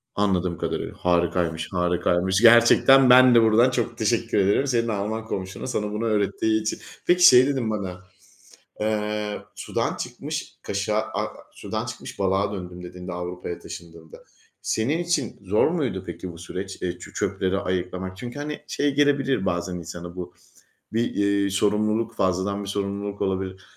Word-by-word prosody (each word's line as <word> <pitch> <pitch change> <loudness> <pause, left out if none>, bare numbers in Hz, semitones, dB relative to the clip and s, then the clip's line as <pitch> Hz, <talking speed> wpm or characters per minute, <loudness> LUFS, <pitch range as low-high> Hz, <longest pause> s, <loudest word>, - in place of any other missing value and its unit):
Anladığım 90 -4 0
kadarıyla - - -3
harikaymış, 85 -2 0
harikaymış. 90 +1 +1
Gerçekten 120 +3 +7
ben 125 0 +8
de 115 - +7
buradan 115 +3 +5
çok 120 -2 -2
teşekkür 115 0 0
ederim 100 +8 +3
senin 120 -3 +1
Alman 110 +1 -2
komşuna 95 -1 -5
sana 105 -5 -2
bunu 105 +2 -2
öğrettiği 110 0 +1
için. 110 - -2 0.3
Peki 180 0 +4
şey 125 +1 +7
dedin 130 -5 -1
bana, 95 -4 -4 0.8
eee, 105 -1 -2
"Sudan - - -2
çıkmış - - -5
kaşığa 105 +2 -1
a - - -4 0.2
sudan - - -5
çıkmış - - -8
balığa 100 +1 +1
döndüm," 90 -2 -7
dediğinde 90 +1 -8
Avrupa'ya 90 0 -5
taşındığında, 80 -2 -11 0.4
senin 130 +9 0
için 170 -8 -1
zor 100 +3 +3
muydu 140 - -2
peki 85 +1 -6
bu 85 - -12
süreç, 95 +3 -7
eee, 90 -1 -3
çö - - -11
çöpleri 95 +1 -1
ayıklamak? 95 0 -3
Çünkü 120 +7 -7
hani, 150 +1 -5
şey 145 -1 0
gelebilir 140 -6 +2
bazen 90 0 -1
insana 85 0 -8
bu, 90 -1 -7 0.6
bir, 115 +2 0
eee, 100 -1 +1
sorumluluk, 105 +3 +1
fazladan 95 +2 0
bir - - -7
sorumluluk 100 0 -3
olabilir. 95 0 -2
100 Hz, 150 wpm, -24 LUFS, 90-115 Hz, 0.8 s, ben